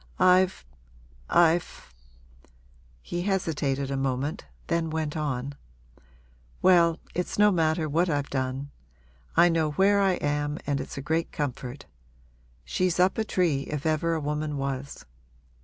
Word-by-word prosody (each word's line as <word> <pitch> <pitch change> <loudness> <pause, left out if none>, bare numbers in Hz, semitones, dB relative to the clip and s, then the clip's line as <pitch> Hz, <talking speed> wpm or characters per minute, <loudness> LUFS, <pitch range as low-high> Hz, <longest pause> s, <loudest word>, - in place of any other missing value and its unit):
I've 185 - +3 0.6
I've 170 - +2 0.5
' - - -31
He 175 - -1
hesitated 145 -8 -1
a - - -1
moment, 135 +2 -2 0.2
then 165 -1 0
went 155 -1 -2
on: 140 -3 -2 1.1
'Well, 170 -3 +5 0.2
it's 180 - -3
no 210 0 +6
matter 160 -2 +1
what 170 +4 +1
I've 145 -2 -1
done. 130 +1 -3 0.7
I 170 +1 +7
know 160 -3 +1
where 200 +3 +4
I 195 -1 +3
am 145 -2 -1
and 140 -1 -1
it's - - -8
a 140 - -5
great 160 +2 0
comfort. 135 -1 -4 0.8
She's 180 - 0
up 185 +4 +3
a - - +2
tree, 170 -10 0
if 150 -1 -4
ever 160 +1 +1
a - - -1
woman 150 0 -2
was. 135 0 -4
155 Hz, 140 wpm, -27 LUFS, 140-175 Hz, 1.1 s, I